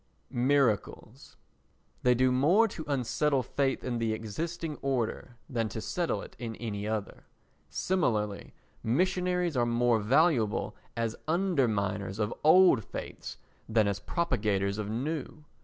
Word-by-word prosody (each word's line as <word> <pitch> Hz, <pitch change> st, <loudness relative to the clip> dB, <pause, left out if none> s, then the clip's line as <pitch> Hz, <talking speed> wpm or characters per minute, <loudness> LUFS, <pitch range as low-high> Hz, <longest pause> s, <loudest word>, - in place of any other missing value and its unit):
Miracles 125 Hz, -1 st, 0 dB, 0.6 s
They 125 Hz, 0 st, +4 dB
do 130 Hz, +1 st, +3 dB
more 170 Hz, -, +4 dB
to 160 Hz, -, -6 dB
unsettle 135 Hz, +1 st, +1 dB
faith 135 Hz, +2 st, -1 dB
in 120 Hz, -2 st, -2 dB
the 115 Hz, -1 st, 0 dB
existing 155 Hz, +9 st, -4 dB
order 125 Hz, -2 st, -2 dB
than 115 Hz, -5 st, -1 dB
to 110 Hz, -, -5 dB
settle 170 Hz, +9 st, -2 dB
it -, -, -12 dB
in 115 Hz, -2 st, -5 dB
any 105 Hz, -3 st, -4 dB
other; 110 Hz, -2 st, -4 dB, 0.4 s
similarly, 110 Hz, -, -1 dB, 0.3 s
missionaries 180 Hz, +5 st, +1 dB
are 120 Hz, -1 st, +2 dB
more 120 Hz, -1 st, +2 dB
valuable 125 Hz, -1 st, +2 dB, 0.2 s
as 115 Hz, -1 st, -1 dB
underminers 110 Hz, -, 0 dB
of 105 Hz, 0 st, -1 dB
old 160 Hz, -, +6 dB
faiths -, -, -7 dB, 0.3 s
than 110 Hz, -2 st, +3 dB
as 100 Hz, -1 st, -1 dB
propagators 105 Hz, -, 0 dB
of 105 Hz, -1 st, -3 dB
new. 150 Hz, +6 st, -4 dB
120 Hz, 125 wpm, -29 LUFS, 110-155 Hz, 0.6 s, old